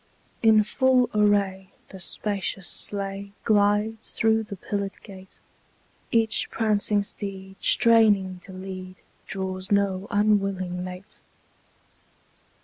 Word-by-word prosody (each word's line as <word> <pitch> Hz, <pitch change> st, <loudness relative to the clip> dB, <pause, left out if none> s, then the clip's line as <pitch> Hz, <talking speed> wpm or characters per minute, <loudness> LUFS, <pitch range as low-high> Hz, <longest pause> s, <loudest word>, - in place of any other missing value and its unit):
In 220 Hz, -2 st, +5 dB
full 255 Hz, +3 st, +2 dB
array, 200 Hz, -2 st, +1 dB, 0.2 s
the 190 Hz, -, -11 dB
spacious 195 Hz, 0 st, -3 dB
sleigh 200 Hz, 0 st, -2 dB
Glides 210 Hz, +1 st, +1 dB
through 225 Hz, 0 st, +2 dB
the 210 Hz, -2 st, -7 dB
pillared 200 Hz, +1 st, -4 dB
gate: 190 Hz, -2 st, -13 dB, 0.7 s
Each 225 Hz, -1 st, +1 dB
prancing 210 Hz, -2 st, +1 dB
steed, 195 Hz, -1 st, -6 dB
straining 205 Hz, -5 st, +4 dB
to 190 Hz, -, -13 dB
lead, 185 Hz, 0 st, -8 dB, 0.3 s
Draws 190 Hz, 0 st, -4 dB
no 200 Hz, -1 st, +1 dB
unwilling 195 Hz, -3 st, 0 dB
mate. 185 Hz, +2 st, -10 dB
200 Hz, 100 wpm, -25 LUFS, 190-215 Hz, 0.7 s, In